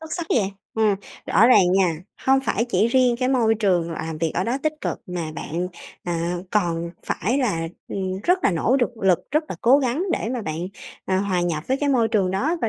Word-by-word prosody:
Xuất 320 0 -9
sắc 340 -2 -4
vậy, 200 -5 +1 0.2
ừm, 215 -2 +3 0.3
rõ 230 - +5
ràng 185 -8 +5
nha, 185 -4 +3 0.3
hông 270 0 +5
phải 230 -3 0
chỉ 235 -2 +1
riêng 250 -1 +3
cái 255 +1 0
môi 230 -4 +3
trường 180 -6 +1
làm 160 -1 -5
việc 165 -1 0
ở 185 - 0
đó 240 +3 0
tích 310 -1 +1
cực - - -3
mà 175 -3 -4
bạn, 175 +5 -3 0.3
à, 170 0 -2
còn 170 -4 0 0.2
phải 245 +8 0
là, 165 -11 0 0.2
ừm, 190 -1 -3
rất 360 +1 +4
là - - +5
nỗ 205 +9 +2
đực 245 -2 +1
lực, 190 -4 +3
rất 305 +3 +1
là 175 - -5
cố 260 +5 +5
gắng 265 +5 0
để 220 - -1
mà 240 -3 -3
bạn, 155 -2 -4 0.5
ờ, 190 0 +1
hòa 190 -3 0
nhập 165 -3 -1
với 265 - +2
cái 285 0 -1
môi 240 -5 +3
trường 195 -5 +1
đó 280 - 0
và 225 - +2
205 Hz, 225 wpm, -23 LUFS, 175-255 Hz, 0.5 s, rõ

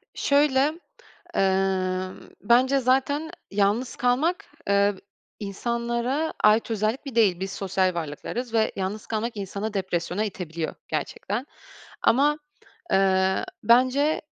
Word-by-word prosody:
Şöyle, 285 +2 +2 0.6
emm, 190 -1 0
bence 255 +5 +4
zaten 270 +5 +1 0.2
yalnız 205 +5 +1
kalmak, 310 +11 +1 0.2
eee, 200 0 +3 0.4
insanlara 235 +7 -2
ait 220 +2 +4
özellik 220 +6 -1
bir 265 -4 -7
değil. 200 -6 +4
Biz 190 0 -3
sosyal 190 -2 0
varlıklarız 175 - -5
ve 220 -1 +2
yalnız 195 +2 -4
kalmak 225 +1 -2
insanı 200 +2 -4
depresyona 190 0 -1
itebiliyor 170 -5 -5
gerçekten 200 - -3 0.6
ama, 290 +5 +3 0.5
eee, 190 0 +3 0.2
bence, 255 +7 +3
215 Hz, 105 wpm, -25 LUFS, 190-255 Hz, 0.6 s, bence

